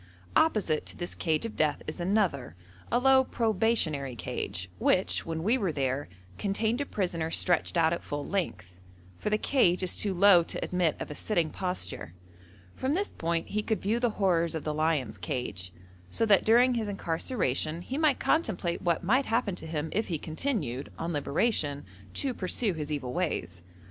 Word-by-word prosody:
Opposite 210 - +2
to - - -8
this 175 - -5
cage 160 +3 0
of 225 - -5
death 150 -2 +1
is 155 - -6
another, 175 - 0 0.4
a 240 - +4
low 265 +1 +5
probationary 210 - 0
cage, 95 -4 -4
which, 185 -2 +2
when 160 0 -3
we 235 +7 +2
were 195 -6 0
there, 135 - -1 0.3
contained 220 +5 0
a 285 - -3
prisoner 170 -5 -1
stretched 175 +1 +1
out 165 0 +4
at 170 - -3
full 145 0 -4
length, 90 - -3 0.4
for - - -1
the 215 - +2
cage 190 -8 +2
is 185 - 0
too 200 -3 0
low 190 -1 +7
to 165 - -3
admit 180 -4 +1
of - - -5
a - - -3
sitting 170 -1 0
posture. 180 - -4 0.6
From 265 +4 0
this 400 +3 -1
point 165 0 -2
he 215 - 0
could 220 0 -1
view 220 +4 +1
the 240 -1 +2
horrors 170 -4 +2
of 160 - -3
the 155 - -2
lion's 150 -9 0
cage, 90 -2 -3 0.4
so 225 - +1
that 205 -3 +5
during 245 +3 +5
his 225 -3 -1
incarceration 165 - -1
he 270 +8 -3
might 305 -4 +3
contemplate 190 - 0
what 170 0 +1
might 255 +9 +2
happen 225 -3 +1
to 175 - -7
him 155 0 -3
if 220 - 0
he 170 - -1
continued, 155 - -3
on 165 +1 -3
liberation, 145 -1 0 0.3
to 270 -2 0
pursue 200 +1 -1
his 155 -2 -5
evil 135 -4 -3
ways. 155 - -2
175 Hz, 180 wpm, -29 LUFS, 155-220 Hz, 0.6 s, low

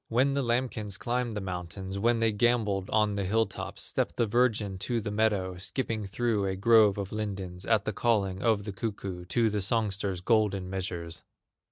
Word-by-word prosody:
When 130 +4 +2
the 140 - +1
lambkins 120 -5 -1
climbed 120 -2 -2
the - - -2
mountains, 95 +1 -5
When 115 +2 +2
they 115 -1 +3
gamboled 105 -3 +1
on 105 -1 +2
the 100 -1 -1
hill 110 +4 +2
tops, 100 - -6
Stepped - - -2
the 120 - +3
virgin 105 -4 +1
to 115 +4 -1
the 105 -1 -4
meadow, 100 -4 +1
Skipping 110 +2 -2
through 105 -1 0
a 95 - -1
grove 105 0 +5
of 100 -2 -4
lindens, 95 -4 -5
At 110 -3 +3
the 105 - -1
calling 100 -4 +1
of 110 -3 +2
the 100 -1 -5
cuckoo, 95 -4 -4
To 115 +5 +2
the 105 -1 -1
songster's 100 -3 0
golden 100 -3 +1
measures. 85 -4 -4
105 Hz, 185 wpm, -29 LUFS, 95-115 Hz, -, grove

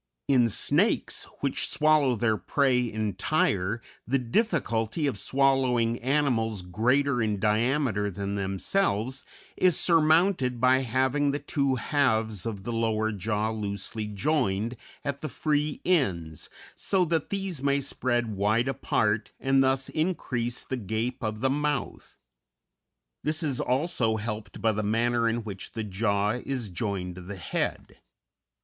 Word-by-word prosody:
In 125 -4 +4
snakes, - - +1 0.2
which - - 0
swallow 150 -4 +3
their 110 0 +1
prey 125 0 +1
entire, 105 - 0 0.2
the 135 +3 +2
difficulty 125 - 0
of 140 - 0
swallowing 125 -1 +2
animals 120 -7 0
greater 125 +7 +1
in 105 -2 0
diameter 110 0 +1
than 100 +1 -4
themselves 105 - -1 0.3
is 185 -2 +3
surmounted 160 -5 +3
by 130 +1 +4
having 130 +3 +1
the 140 - 0
two 140 -2 0
halves 110 -7 0
of 100 -4 -5
the 120 - -4
lower 110 -1 0
jaw 105 +2 -1
loosely 105 0 -4
joined 105 -1 0 0.3
at 140 -1 -3
the 155 - -4
free 150 -1 -1
ends, 90 - 0 0.3
so 190 -2 +1
that 165 -2 -1
these 195 -7 -3
may 140 0 +2
spread 120 -5 -1
wide 110 +5 +2
apart 110 -5 0
and 135 0 +3
thus 135 0 +1
increase 125 -8 -1
the 130 - -4
gape 115 +4 -3
of 110 0 -3
the 135 - +2
mouth. 145 -1 -2 1.1
This 155 +2 +1
is 140 -5 0
also 130 -4 +1
helped 105 +1 -6
by 110 - +4
the 110 0 -2
manner 115 +2 +1
in 115 0 -2
which 100 -3 -7
the 110 - -3
jaw 100 0 0
is 130 -6 -3
joined 90 -1 -3
to - - -7
the 95 +3 -7
head. 95 - -3
120 Hz, 135 wpm, -27 LUFS, 105-140 Hz, 1.1 s, In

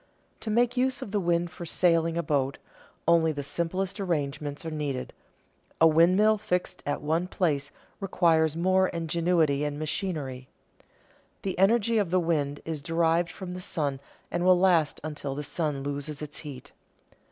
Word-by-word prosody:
To 220 - -5
make 240 +3 +2
use 260 +1 +1
of 200 - -8
the 205 - +1
wind 175 -1 0
for 175 - -9
sailing 165 -1 +2
a 170 - 0
boat, 140 -3 0 0.5
only 165 -1 +4
the 145 -2 -4
simplest 185 +6 -2
arrangements 150 -5 -2
are 160 - -3
needed; 145 -4 -3 0.7
a 165 - +7
windmill 185 +7 +4
fixed 180 -3 -2
at 145 - -2
one 165 +4 0
place 145 -7 -1 0.3
requires 165 -5 +2
more 185 +2 +3
ingenuity 165 -3 +1
and 145 -1 -2
machinery. 150 -5 -3 1.0
The 190 - -2
energy 225 +3 +4
of 200 -5 0
the 185 +2 +3
wind 150 -4 -1
is 160 -3 -4
derived 165 +2 +1
from 185 -2 -7
the 180 - -6
sun 145 -6 -2 0.3
and 175 - -1
will 185 0 +6
last 175 -5 +3
until 145 -3 -4
the 150 - -4
sun 145 -1 -2
loses 145 +1 -4
its 150 0 -5
heat. 145 -5 -9
165 Hz, 160 wpm, -27 LUFS, 150-180 Hz, 1.0 s, a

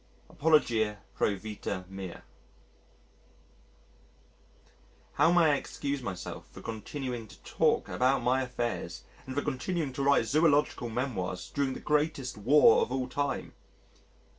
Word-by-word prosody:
Apologia 115 -9 +2 0.2
pro 100 - +1
vita 100 -2 -5
mea 95 -2 -7 2.9
How 165 - +4
may 170 -3 +5
I - - +4
excuse 140 0 -4
myself 95 -7 -6
for - - -11
continuing 120 +1 -5
to - - -15
talk - - +1
about 130 0 +1
my 130 +2 +2
affairs 120 - -3 0.2
and 130 - -5
for 145 - 0
continuing 150 +1 -2
to 140 - -4
write 140 -4 +4
zoological 145 -3 +2
memoirs 110 -7 -3
during 140 -2 0
the - - -6
greatest 150 -4 0
War 120 +5 +6
of - - -1
all 130 -1 -1
time? 140 +2 -2
130 Hz, 125 wpm, -30 LUFS, 110-145 Hz, 2.9 s, War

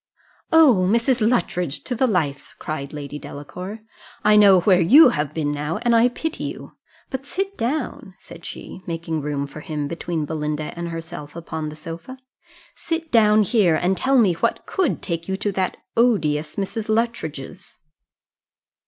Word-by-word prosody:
"O, 265 - +6
Mrs. 235 +3 +2
Luttridge 180 - 0
to - - -3
the 255 +2 +2
life!" 150 - -2
cried 145 -2 -5
Lady 145 -1 -7
Delacour: 180 +11 -8 0.4
"I 210 0 +5
know 200 -3 +7
where 185 -1 +4
you 265 - +8
have 150 -7 -2
been 150 -2 -1
now, 150 +2 -2
and 240 -1 +3
I 230 +1 +5
pity 320 +6 -4
you - - -7 0.4
but 265 0 -4
sit 390 +1 -3
down," 235 - -3
said 170 0 -14
she, 185 - -8
making 165 -2 -3
room 145 -1 -2
for 140 +2 -10
him 150 -1 -4
between 165 -1 -3
Belinda 150 0 -3
and 170 0 -4
herself 165 -2 -7
upon 160 -2 -5
the 150 - -9
sofa, 165 +11 -8 0.6
"sit 330 -1 -4
down 215 -2 +5
here, 195 -5 +3
and 180 +4 +1
tell 270 +6 +2
me 210 -7 +4
what 165 - -1
could 380 -3 -1
take 170 -1 -4
you 190 - -1
to 205 +1 -1
that 190 -1 -2 0.2
odious 155 -11 +1
Mrs. 210 +2 -4
Luttridge's." 190 - -3
180 Hz, 160 wpm, -22 LUFS, 155-230 Hz, 0.6 s, you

